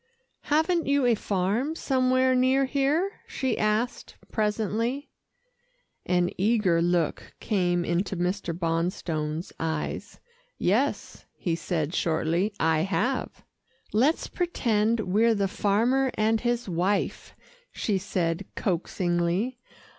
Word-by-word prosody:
"Haven't 320 Hz, +2 st, +2 dB
you 280 Hz, -1 st, +3 dB
a 240 Hz, -, +5 dB
farm 210 Hz, -, -1 dB
somewhere 260 Hz, -3 st, +2 dB
near 260 Hz, +2 st, +3 dB
here?" 290 Hz, +8 st, 0 dB
she 260 Hz, -4 st, -1 dB
asked 215 Hz, +3 st, -1 dB, 0.2 s
presently. 220 Hz, +5 st, -1 dB, 1.0 s
An 180 Hz, -1 st, +2 dB
eager 195 Hz, -5 st, +3 dB
look 170 Hz, -2 st, 0 dB
came 175 Hz, -5 st, 0 dB
into 180 Hz, +3 st, -1 dB
Mr. 180 Hz, +1 st, -1 dB
Bonstone's 165 Hz, -1 st, -2 dB
eyes. 160 Hz, -1 st, -3 dB, 0.4 s
"Yes," -, -, 0 dB
he 170 Hz, -2 st, -1 dB
said 165 Hz, -1 st, -2 dB
shortly. 170 Hz, +5 st, +1 dB
"I 160 Hz, -1 st, +3 dB
have." 205 Hz, +9 st, -1 dB, 0.5 s
"Let's 265 Hz, +10 st, +2 dB
pretend 230 Hz, -, 0 dB
we're 220 Hz, +4 st, +3 dB
the 200 Hz, -1 st, +1 dB
farmer 230 Hz, +8 st, +2 dB
and 220 Hz, +1 st, +2 dB
his 240 Hz, -1 st, -1 dB
wife," 185 Hz, +3 st, -1 dB, 0.4 s
she 200 Hz, -3 st, -1 dB
said 180 Hz, -1 st, -2 dB
coaxingly. 180 Hz, +5 st, -1 dB
205 Hz, 105 wpm, -27 LUFS, 175-250 Hz, 1.0 s, a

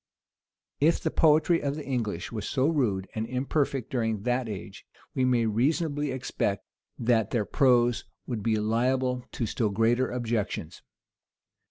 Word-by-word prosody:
If 160 Hz, +4 st, +3 dB
the -, -, -2 dB
poetry 160 Hz, +2 st, +4 dB
of 140 Hz, -1 st, -1 dB
the 155 Hz, -, -6 dB
English 115 Hz, -10 st, -2 dB
was 110 Hz, -3 st, -4 dB
so 135 Hz, 0 st, +2 dB
rude 110 Hz, -, 0 dB
and 110 Hz, 0 st, -3 dB
imperfect 135 Hz, 0 st, -1 dB
during 115 Hz, -5 st, -1 dB
that 125 Hz, 0 st, 0 dB
age, 100 Hz, -3 st, -7 dB, 0.3 s
we 130 Hz, -, +1 dB
may 125 Hz, -2 st, +3 dB
reasonably 145 Hz, +6 st, 0 dB
expect 125 Hz, -6 st, -2 dB, 0.3 s
that 115 Hz, -3 st, +2 dB
their 110 Hz, -4 st, 0 dB
prose 120 Hz, -3 st, +3 dB, 0.2 s
would 115 Hz, -4 st, -3 dB
be 110 Hz, +1 st, +1 dB
liable 125 Hz, +4 st, +1 dB
to 120 Hz, -, -1 dB
still 110 Hz, 0 st, 0 dB
greater 115 Hz, +5 st, +2 dB
objections. 115 Hz, -8 st, -3 dB
120 Hz, 145 wpm, -27 LUFS, 110-135 Hz, 0.3 s, poetry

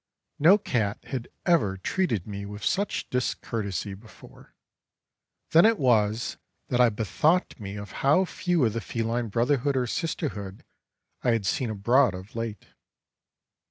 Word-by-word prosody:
No 175 Hz, +7 st, +7 dB
cat 110 Hz, -, -1 dB
had 125 Hz, -3 st, -5 dB, 0.2 s
ever 125 Hz, -, +2 dB
treated 115 Hz, -, -1 dB
me 100 Hz, -1 st, -6 dB
with 105 Hz, +1 st, -8 dB
such 200 Hz, +2 st, -1 dB
discourtesy 105 Hz, -6 st, -2 dB
before. 110 Hz, +3 st, -15 dB, 1.0 s
Then 165 Hz, -, +7 dB
it 225 Hz, +1 st, +5 dB
was 115 Hz, -, +1 dB, 0.3 s
that 125 Hz, 0 st, +2 dB
I 120 Hz, -, +6 dB
bethought 150 Hz, -, +1 dB
me 100 Hz, -1 st, -6 dB
of 105 Hz, 0 st, -7 dB
how 150 Hz, +8 st, +4 dB
few 175 Hz, -5 st, 0 dB
of 110 Hz, -, 0 dB
the 115 Hz, -, -2 dB
feline 115 Hz, +1 st, -2 dB
brotherhood 130 Hz, +5 st, +1 dB
or 125 Hz, -, +1 dB
sisterhood 115 Hz, -, -4 dB, 0.6 s
I 120 Hz, -, +2 dB
had 110 Hz, -4 st, -1 dB
seen 115 Hz, +6 st, 0 dB
abroad 115 Hz, +2 st, +3 dB
of 95 Hz, +4 st, -11 dB
late. 115 Hz, -4 st, -4 dB
115 Hz, 140 wpm, -26 LUFS, 105-140 Hz, 1.0 s, No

